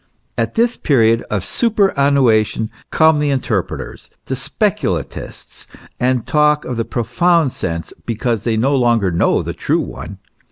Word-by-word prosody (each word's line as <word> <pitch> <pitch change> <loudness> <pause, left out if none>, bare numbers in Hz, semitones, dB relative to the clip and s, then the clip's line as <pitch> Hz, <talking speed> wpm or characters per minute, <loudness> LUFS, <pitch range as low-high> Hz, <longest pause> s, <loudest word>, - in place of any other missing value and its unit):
At - - -2
this 235 +1 +2
period 115 -5 +2
of 100 -3 -2
superannuation 140 - +2 0.2
come 160 -1 +4
the 150 -1 +1
inter 125 -7 0
preters, 70 -7 -9 0.2
the - - -3
speculatists, - - -3 0.3
and 125 -1 +1
talk 150 0 +2
of 125 - -4
the 115 -1 -2
profound 135 +6 +1
sense, 85 -6 -4
because 115 -1 -1
they 115 -2 0
no 135 +5 +2
longer 120 -7 +2
know 85 - +1
the - - -4
true - - 0
one. - - -7
125 Hz, 145 wpm, -17 LUFS, 110-150 Hz, 0.3 s, come